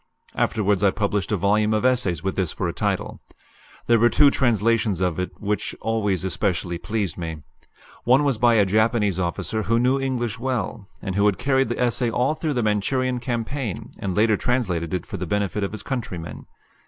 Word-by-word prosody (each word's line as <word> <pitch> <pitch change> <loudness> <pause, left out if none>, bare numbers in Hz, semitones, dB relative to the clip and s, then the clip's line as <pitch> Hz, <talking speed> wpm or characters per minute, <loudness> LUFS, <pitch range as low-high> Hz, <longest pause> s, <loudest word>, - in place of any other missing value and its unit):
Afterwards 105 -3 +1
I 100 - +6
published 100 -1 -1
a 105 - +2
volume 105 +3 +2
of 110 - 0
essays 110 - +1
with 95 0 -2
this 95 -5 0
for - - -3
a - - -3
title. - - -2 0.6
There 115 -1 +4
were 120 +2 +5
two 145 +2 +5
translations 115 -5 +1
of 90 -3 0
it 90 - -4
which 105 -1 -2
always 105 -5 0
especially 90 -3 -1
pleased 105 -7 -3
me. 80 -3 -5 0.6
One 130 +4 +4
was 135 -6 +1
by 120 -1 +4
a 105 -3 +5
Japanese 105 -1 +2
officer 90 +5 -2
who 115 +3 +1
knew 130 +3 +2
English 120 -4 -2
well, 120 -5 -3 0.2
and 95 - -3
who 100 +2 +3
had 100 -3 +1
carried 135 +2 +1
the 120 - -3
essay 120 0 +1
all 125 +6 +1
through 155 -1 -2
the 120 -3 0
Manchurian 125 +5 0
campaign, 120 -2 -4
and 95 -2 -3
later 110 0 +3
translated 95 -11 -1
it 90 - -4
for 105 - -6
the 90 -1 -4
benefit 100 +2 -1
of 100 - -2
his 110 -2 -6
countrymen. 90 - -5
110 Hz, 190 wpm, -23 LUFS, 95-120 Hz, 0.6 s, I